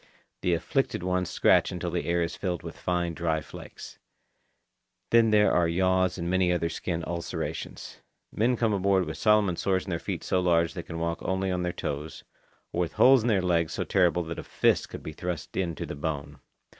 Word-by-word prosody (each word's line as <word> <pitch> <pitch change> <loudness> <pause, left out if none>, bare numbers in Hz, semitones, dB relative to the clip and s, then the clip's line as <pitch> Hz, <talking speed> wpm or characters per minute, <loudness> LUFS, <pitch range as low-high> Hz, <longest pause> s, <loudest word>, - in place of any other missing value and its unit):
The 90 -1 +2
afflicted 130 - -1
ones 90 -1 0
scratch - - +3
until 90 -1 -4
the 85 0 -2
air 85 0 +2
is 85 0 -3
filled 90 -3 -3
with - - -7
fine 90 -1 -1
dry 80 -1 0
flakes. - - -11 1.1
Then 115 -1 +5
there 105 -1 +4
are 85 -1 +3
yaws 95 +1 +1
and 85 -1 -3
many 90 0 +2
other 85 -1 0
skin 85 0 -3
ulcerations. 85 -1 -5 0.3
Men 120 +3 +1
come 115 -2 +1
aboard 95 -1 +2
with - - -6
Solomon 105 -5 +3
sores 95 -1 0
in 95 - -6
their 85 - -1
feet - - -4
so 95 - +1
large 85 -2 +2
that 90 - -5
they - - -21
can 85 - -6
walk 85 0 -2
only 95 0 -1
on 90 -1 -1
their 90 0 -1
toes, 75 -1 -5 0.5
or - - -2
with 85 -2 -1
holes 130 -1 +6
in 115 - -2
their 100 -5 +2
legs 85 -3 +1
so - - -2
terrible 90 -2 +2
that 85 0 -6
a - - -6
fist - - +1
could - - -8
be 80 - -6
thrust 85 -1 -5
in 85 -3 -1
to - - -5
the - - -6
bone. 75 -1 -4
90 Hz, 210 wpm, -27 LUFS, 85-95 Hz, 1.1 s, holes